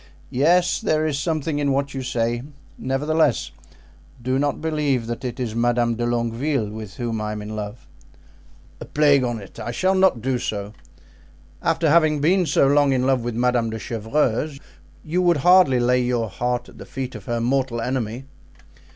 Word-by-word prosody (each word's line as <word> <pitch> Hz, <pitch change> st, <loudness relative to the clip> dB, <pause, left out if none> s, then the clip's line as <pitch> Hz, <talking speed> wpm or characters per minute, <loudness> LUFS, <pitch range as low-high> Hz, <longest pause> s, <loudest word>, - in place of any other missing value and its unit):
Yes, 175 Hz, +7 st, +3 dB
there 155 Hz, 0 st, +1 dB
is 145 Hz, -3 st, -1 dB
something 155 Hz, -1 st, -1 dB
in 140 Hz, -2 st, +1 dB
what 140 Hz, +1 st, -1 dB
you 135 Hz, -, -4 dB
say; 120 Hz, -1 st, -1 dB, 0.3 s
nevertheless, 145 Hz, +1 st, 0 dB, 0.7 s
do 130 Hz, +2 st, -1 dB
not 145 Hz, 0 st, 0 dB
believe 150 Hz, -6 st, 0 dB
that 120 Hz, +2 st, -5 dB
it 125 Hz, 0 st, -4 dB
is 120 Hz, -4 st, -2 dB
Madame 120 Hz, 0 st, +1 dB
de 120 Hz, +1 st, -2 dB
Longueville 120 Hz, 0 st, -1 dB
with 110 Hz, -2 st, -8 dB
whom 115 Hz, -3 st, -3 dB
I 105 Hz, 0 st, -3 dB
am 105 Hz, -, -5 dB
in 105 Hz, +1 st, -6 dB
love." 105 Hz, +2 st, -6 dB, 0.9 s
"A -, -, -7 dB
plague 145 Hz, -3 st, +3 dB
on't! 115 Hz, -5 st, -5 dB
I -, -, -5 dB
shall 185 Hz, +11 st, +1 dB
not 190 Hz, -9 st, +3 dB
do 130 Hz, -1 st, 0 dB
so. 105 Hz, -2 st, -4 dB, 0.9 s
After 165 Hz, -1 st, +1 dB
having 155 Hz, -1 st, +4 dB
been 175 Hz, +4 st, +2 dB
so -, -, +3 dB
long 140 Hz, 0 st, +4 dB
in 130 Hz, -1 st, +1 dB
love 135 Hz, -2 st, +2 dB
with 120 Hz, -1 st, -4 dB
Madame 120 Hz, -1 st, +1 dB
de 110 Hz, -, -4 dB
Chevreuse, 125 Hz, +5 st, -1 dB, 0.5 s
you 170 Hz, +4 st, 0 dB
would 175 Hz, -3 st, +3 dB
hardly 180 Hz, -8 st, +6 dB
lay 125 Hz, +1 st, +3 dB
your 120 Hz, -3 st, 0 dB
heart 120 Hz, +4 st, -2 dB
at -, -, -15 dB
the -, -, -9 dB
feet 130 Hz, -1 st, -5 dB
of -, -, -9 dB
her 120 Hz, -2 st, -1 dB
mortal 125 Hz, 0 st, 0 dB
enemy!" 125 Hz, 0 st, -3 dB
130 Hz, 175 wpm, -22 LUFS, 115-150 Hz, 0.9 s, hardly